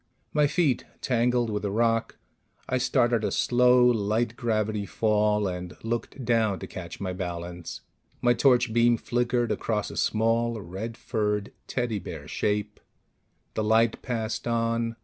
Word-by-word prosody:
My 150 -1 +4
feet 145 -5 +1 0.2
tangled 120 -1 +1
with 105 0 -2
a 100 - 0
rock. 115 +2 +1 0.5
I 130 - 0
started 120 -3 +2
a - - +1
slow, 125 0 +4
light 115 0 +1
gravity 110 -4 -1
fall, 105 -1 +2
and 90 -1 -5
looked 120 +3 -3
down 110 -4 +2
to - - -7
catch 85 -2 -8
my 95 -2 -3
balance. 90 -1 -6 0.4
My 120 0 +4
torch 120 -2 +3
beam 120 0 +4
flickered 120 -1 0
across 105 -1 -1
a - - -8
small, 115 +1 +1
red 105 +5 -6
furred 105 -3 -1 0.2
teddy 120 -4 -1
bear 75 -6 -8
shape. 105 -1 -1 0.7
The 110 - -1
light 110 +1 +3
passed 115 -2 -3
on. 115 0 0
115 Hz, 145 wpm, -27 LUFS, 105-120 Hz, 0.7 s, My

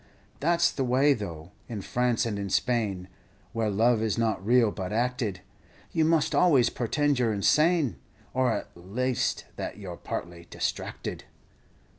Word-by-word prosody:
That's 170 +3 +3
the 135 - -2
way 130 +3 +4
tho', 85 - -7 0.2
in 110 -4 -5
France 125 +1 +1
and 105 -3 -2
in 100 -1 -3
Spain, 105 -5 0 0.5
Where 115 -2 0
love 110 +3 +3
is 110 -1 0
not 110 -4 0
real, 115 0 +4
but 95 -3 -5
acted, 115 -4 -1 0.5
You 160 - +2
must 160 -2 +2
always 140 -10 +4
portend 145 +3 0
you 125 - +2
're - - +1
insane, 150 - +3 0.4
Or 130 -1 +2
at - - -4
laste 115 +8 -1
that - - -5
you 95 -3 -7
're 85 - -8
partly 85 0 -6
distracted. - - -4
115 Hz, 155 wpm, -27 LUFS, 100-130 Hz, 0.5 s, way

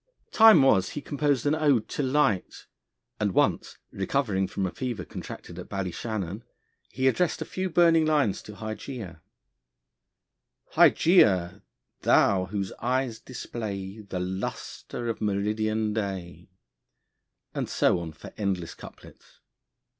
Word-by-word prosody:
Time 220 -10 +8
was 95 -8 +4
he - - -5
composed 145 -2 -1
an 145 - +3
ode 145 -8 +2
to - - -2
Light, 130 -8 0 0.5
and 100 -3 0
once - - +1
recovering 95 -2 0
from 95 0 -2
a 95 - -2
fever 120 -8 -4
contracted 85 +1 -9
at 90 - -9
Ballyshannon, 100 +1 -4 0.5
he 130 +1 0
addressed 175 +6 +1
a - - -4
few 185 0 -3
burning 165 -1 +4
lines 145 -11 +1
to 105 - -11
Hygeia: 110 - -7 1.5
Hygeia! 100 - +4 0.4
thou 95 -2 +4
whose 95 0 -4
eyes 125 -2 -1
display 105 -5 -6
The 100 -3 -5
lustre 95 +5 -5
of 115 - -3
meridian 105 +1 0
day; 95 -5 -5 1.0
and - - -3
so - - +2
on 85 -2 -6
for 80 - -12
endless 95 -5 -2
couplets. - - -15
110 Hz, 125 wpm, -27 LUFS, 95-130 Hz, 1.5 s, Time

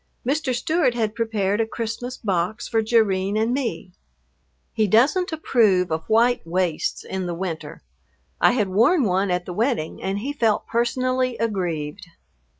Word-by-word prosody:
Mr. 275 +1 0
Stewart 260 +1 +1
had 220 -3 -1
prepared 220 -3 0
a 225 - -1
Christmas 235 +3 -5
box 185 -1 -2
for 225 -1 +1
Jerrine 210 -3 +1
and 225 +3 +1
me. 250 -8 -3 0.8
He 220 -2 +1
doesn't 275 - +3
approve 215 - +2
of 160 0 -3
white 235 +3 +3
waists 170 -1 -1
in 190 -1 -4
the 175 - -3
winter. 165 - -6 0.6
I - - +5
had 210 -6 0
worn 235 - +3
one 190 -1 +1
at 180 0 -1
the 180 - -6
wedding 225 - -1
and 195 +1 -2
he 265 +8 -3
felt 225 -6 +1
personally 255 +1 0
aggrieved. 175 -9 -3
220 Hz, 150 wpm, -23 LUFS, 185-245 Hz, 0.8 s, I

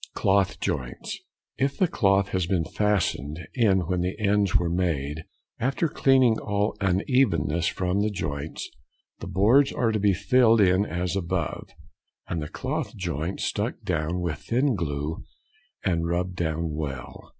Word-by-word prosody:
Cloth 100 -1 +2
Joints.—If 100 - -4
the 185 - +3
cloth 100 -8 +2
has 95 -3 -1
been 90 -4 +1
fastened 90 -8 0 0.2
in 105 -7 +3
when 90 +1 -1
the 90 +3 -2
ends 100 -1 +2
were 90 -3 +3
made, 80 -4 -1 0.3
after 135 +7 +1
cleaning 130 -5 +3
all 105 0 -1
unevenness 90 - +2
from 95 +2 0
the 105 - +1
joints, 75 -6 -4 0.5
the - - -7
boards 110 +10 +4
are 115 -3 +1
to 110 - 0
be 100 -1 +3
filled 115 +4 +4
in 95 0 +4
as 90 +2 -2
above, 85 -4 -2 0.6
and 85 -3 -3
the 75 - -5
cloth 140 0 -4
joint 85 -1 -3
stuck 110 +4 -1
down 85 -2 -1
with 85 -3 -2
thin 130 +3 +1
glue, 75 -4 -3 0.6
and 85 -3 +1
rubbed 90 +2 -1
down 80 -2 -2
well. 70 -4 -6
95 Hz, 145 wpm, -26 LUFS, 85-105 Hz, 0.6 s, boards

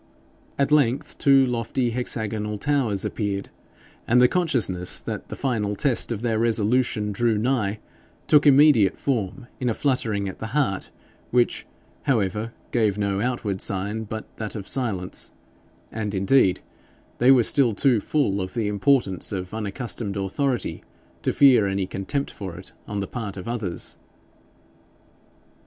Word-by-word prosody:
At 140 +1 +1
length 145 0 +1
two 135 -1 +5
lofty 120 0 -1
hexagonal 110 -3 -2
towers 125 -5 0
appeared, 100 -3 -3 0.6
and 120 +2 +4
the 125 - +7
consciousness 115 - +1
that - - -6
the - - -5
final 110 -6 -1
test 130 0 +1
of 115 -1 -3
their 115 -2 0
resolution 115 -1 +1
drew 115 +2 +1
nigh 110 -3 0 0.5
took 150 -1 +5
immediate 140 -8 +6
form 120 -2 -2
in 125 -2 0
a 115 - -1
fluttering 115 -8 0
at 95 - -7
the 110 +4 -6
heart, 100 -10 0 0.4
which, 120 0 +1 0.4
however, 110 -2 0 0.2
gave 110 -4 +1
no 100 -1 -1
outward 110 -6 -2
sign 105 +3 0
but 110 +1 -6
that 110 0 -4
of 100 -3 -6
silence; 100 -9 -2 0.6
and 105 -2 -3
indeed 95 0 +3 0.6
they 125 - +4
were 130 -3 +7
still 120 -3 +3
too 125 -3 +3
full 100 -5 0
of 95 +3 -6
the 115 -3 0
importance 105 - +1
of 95 -1 -5
unaccustomed 110 -1 -3
authority 120 +7 -2 0.4
to - - 0
fear 130 -7 +5
any 95 0 -1
contempt 95 +10 -3
for 95 -4 -7
it 90 - -9 0.2
on 105 -1 -3
the 100 - -4
part 105 -5 -4
of 90 - -7
others. 110 -7 -4
110 Hz, 145 wpm, -24 LUFS, 100-125 Hz, 0.6 s, the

